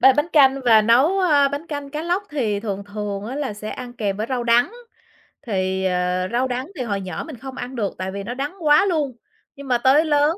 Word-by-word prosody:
ba 265 - +7
bánh 295 +5 0
canh 275 -2 +5
và 220 -2 +6
nấu, 265 - +4
ơ, 295 -6 +4
bánh 285 +4 -5
canh 285 -3 -5
cá 300 +2 -4
lóc 350 +4 0
thì 220 -9 -1
thường 200 -2 -4
thường 205 -1 -5
á 255 - -5
là 285 -6 -2
sẽ 215 +1 -7
ăn 245 -1 -7
kèm 205 -5 -2
với 215 +2 -3
rau 250 -2 -2
đắng. 240 - +3 0.8
Thì, 190 -2 -1
ờ, 180 0 0
rau 250 +2 +1
đắng 255 +2 -3
thì 255 - -2
hồi 200 -4 -2
nhỏ 180 -3 -5
mình 310 - -8
không 265 +2 -9
ăn 250 +2 -6
được, 210 -5 -2
tại 185 0 -4
vì 200 +1 -5
nó 235 - -5
đắng 280 +7 -4
quá 300 +4 +5
luôn. 300 -9 -1 0.4
Nhưng 280 -1 -10
mà 250 - +3
tới 270 +6 +4
lớn 300 +3 +2
250 Hz, 245 wpm, -22 LUFS, 210-290 Hz, 0.8 s, ba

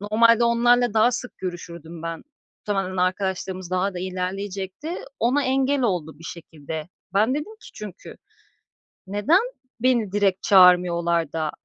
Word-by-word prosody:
normalde 230 +3 +4
onlarla 240 0 +3
daha 220 +3 +5
sık 250 +1 -6
görüşürdüm 170 -2 -7
ben. 165 -1 -5 0.4
Muhtemelen 195 -2 -2
arkadaşlığımız 185 0 -2
daha 185 +1 0
da - - -4
ilerleyecekti. 190 - -4 0.3
Ona 260 +5 +2
engel 270 +1 +1
oldu 175 -9 -1
bir 165 - -14
şekilde. 160 -1 -7 0.3
Ben 215 +5 +3
dedim 300 +9 -4
ki - - -12
çünkü 205 -3 -9 0.9
"Neden 205 - +3 0.4
beni 235 -6 +2
direkt 200 -2 +1
çağırmıyorlar 175 -4 +4
da 155 -2 -1
190 Hz, 130 wpm, -23 LUFS, 175-230 Hz, 0.9 s, daha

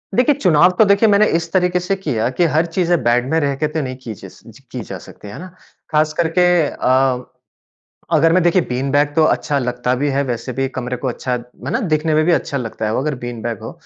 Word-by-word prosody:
देखिए, 255 +4 +3
चुनाव 180 - +4
तो 220 - +6
देखिए 200 +2 +4
मैंने 205 +1 +5
इस 165 -1 -8
तरीके 180 -1 +2
से 180 +2 -1
किया 120 - -2
कि 175 - +3
हर 160 +2 +3
चीज़े 175 +1 0
बैग 120 +1 +2
में 160 - +2
रह 140 -2 0
के 155 +2 -1
तो 155 0 -3
नहीं 130 -1 -5
की 115 - -6
जस - - -13
ज - - -14
की - - -5
जा - - -7
सकती, 105 - -13
है 105 - -9
ना? 185 - -8 0.4
ख़ास 155 0 +2
करके 170 +2 +2 0.2
अ, 130 -1 +1 0.9
अगर 165 +1 +4
मैं 185 - +4
देखिए 175 +1 +3
बीन 130 +2 -2
बैग 145 +1 +2
तो 160 - +4
अच्छा 145 -1 +1
लगता 125 0 -1
भी 145 +3 -1
है 140 +1 0
वैसे 125 0 -4
भी 135 +1 -1
कमरे 125 -1 -4
को 130 - -4
अच्छा 125 0 -3
है 125 0 -6
ना? - - 0
देखने 155 -6 0
में 155 - +3
भी 175 - +3
अच्छा 140 - 0
लगता 115 -3 -4
है 110 - -1
वो, - - 0
अगर 150 -1 -2
बीन 120 -2 -6
बैग 115 -3 -4
हो। - - -7
145 Hz, 245 wpm, -18 LUFS, 125-170 Hz, 0.9 s, तो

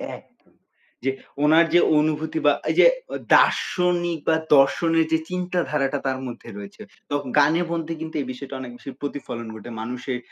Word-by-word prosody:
এক - - -13 0.8
যে 135 - +1 0.3
উনার 160 +3 +6
যে 175 - +7 0.2
অনুভূতি 155 - -1
বা - - +6 0.2
এই - - -3
যে - - +8 0.5
দার্শনিক 175 -2 +2
বা 160 - +4 0.2
দর্শনের 165 +4 +3
যে 160 - +4
চিন্তাধারাটা 175 -6 -1
তার 130 -1 -1
মধ্যে 120 -1 -9
রয়েছে। 205 +1 -10 0.3
তো 145 - -1 0.2
গানের 155 +5 +4
মধ্যে 165 -1 -2
কিন্তু 160 0 -6
এই 130 - -6
বিষয়টা 130 +1 -7
অনেক 125 -2 -7
বেশি 135 - -10
প্রতিফলন 120 -5 -5
ঘটে। 110 +2 -10
মানুষের 125 +2 -4
150 Hz, 155 wpm, -23 LUFS, 135-170 Hz, 0.8 s, যে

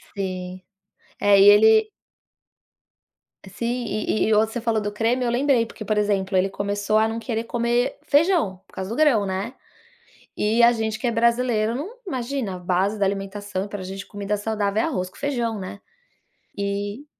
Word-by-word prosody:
Sim. 185 -1 -4 0.6
É, 205 -1 +5
e 195 - +7
ele 220 +1 +6 1.6
Sim, 240 +5 -3
e 215 0 -1
e 220 - +4
o 210 - +5
você 220 +2 -1
falou 225 -2 0
do 205 - -2
creme 235 +4 0
eu - - +1
lembrei, 250 -2 +2
porque, 225 - -9
por 215 0 -1
exemplo, 195 -2 +1
ele 190 +1 +2
começou 205 +2 -1
a 220 0 +4
não 225 +1 -3
querer 225 -1 -3
comer 240 +1 0
feijão, 295 - +2
por - - -27
causa 190 0 -5
do 230 - -3
grão, 270 -9 +3
né, 190 +5 -3 0.8
e 225 +3 +2
a 235 - +8
gente 220 -2 -2
que - - -6
é 235 - +2
brasileiro 235 -1 +1
não 380 - -6
imagina, 255 - -3
a 180 - -8
base 185 +4 0
da 200 - +1
alimentação 195 0 -3
pra 200 -2 -6
gente, 195 +1 -7
comida 205 0 -3
saudável 210 0 -1
é - - 0
arroz 185 - -2
com - - -19
feijão, 240 -7 -2
né, 190 +2 -8 0.8
e 200 +5 -3
215 Hz, 180 wpm, -23 LUFS, 200-235 Hz, 1.6 s, a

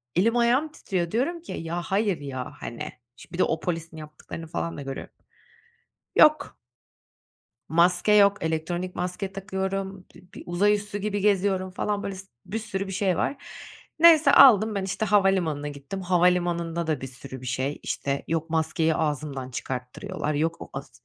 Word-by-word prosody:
Elim 225 +7 +3
ayağım 245 +6 +3
titriyor, 180 - -3
diyorum 330 +9 -1
ki, 345 - -10
"Ya, 165 +2 -3
hayır 195 0 0
ya." 130 -3 -5
hani, 115 - -6 0.2
şimdi 165 - -16
bir 175 - -5
de - - +6
o 160 - 0
polisin 165 -1 -4
yaptıklarını 155 +1 -9
falan 165 +1 -4
da 145 - -6
görüyorum. 135 -1 -6 1.0
Yok. 305 0 +5 1.1
Maske 175 +5 +3
yok, 200 -1 +6
elektronik 170 +3 -2
maske 180 +2 -3
takıyorum, 190 -1 -4
bi 180 - -16
bir - - -9
uzay 190 +4 +2
üssü 205 0 -5
gibi 205 0 -2
geziyorum 195 -2 +1
falan, 205 +2 -2
böyle, 195 - -4
s 190 +1 -10 0.2
bir 220 - -3
sürü 200 -3 -4
bir - - -5
şey 185 -2 0
var. 280 - -2 0.6
Neyse 315 -3 +7
aldım 220 -6 +7
ben, 195 - -1
işte, 195 +3 -2
havalimanına 190 -8 +2
gittim, 145 +7 -7
havalimanında 175 -2 +1
da 155 -4 -1
bir 130 - -4
sürü 130 0 -10
bir - - -9
şey, 130 +3 -2
işte, 140 0 -2
yok 165 0 -1
maskeyi 160 0 +1
ağzımdan 145 -4 -2
çıkarttırıyorlar, 135 +8 -4
yok 160 +3 0
o - - -8
as 135 -3 -7
180 Hz, 165 wpm, -26 LUFS, 160-200 Hz, 1.1 s, Neyse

